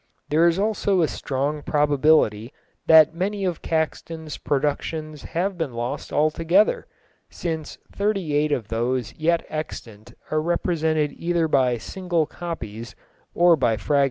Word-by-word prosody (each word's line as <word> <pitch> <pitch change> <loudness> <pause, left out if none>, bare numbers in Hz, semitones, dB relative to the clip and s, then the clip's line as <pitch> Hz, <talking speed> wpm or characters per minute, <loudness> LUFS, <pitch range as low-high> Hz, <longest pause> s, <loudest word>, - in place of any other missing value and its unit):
There 160 +3 +4
is 170 0 +2
also 200 -3 +1
a - - +2
strong 145 +3 -2
probability 145 -7 +2 0.4
that 160 -1 +7
many 195 +3 -2
of 175 -3 -2
Caxton's 160 -1 -3
productions 150 +2 -2
have 180 +2 -3
been 140 -7 -3
lost 120 +4 -4
altogether, 165 - +2 0.4
since 160 -3 -5 0.2
thirty 200 -6 -1
eight 150 +1 +2
of 115 -7 -2
those 120 +1 -1
yet 165 +1 0
extant 115 -8 -7 0.2
are 155 0 +1
represented 160 -3 0
either 170 0 0
by 130 -5 +2
single 175 - -2
copies 115 -11 -7 0.4
or 175 0 +6
by 120 -6 +1
fragments. 140 +8 +1
155 Hz, 130 wpm, -23 LUFS, 140-170 Hz, 0.4 s, that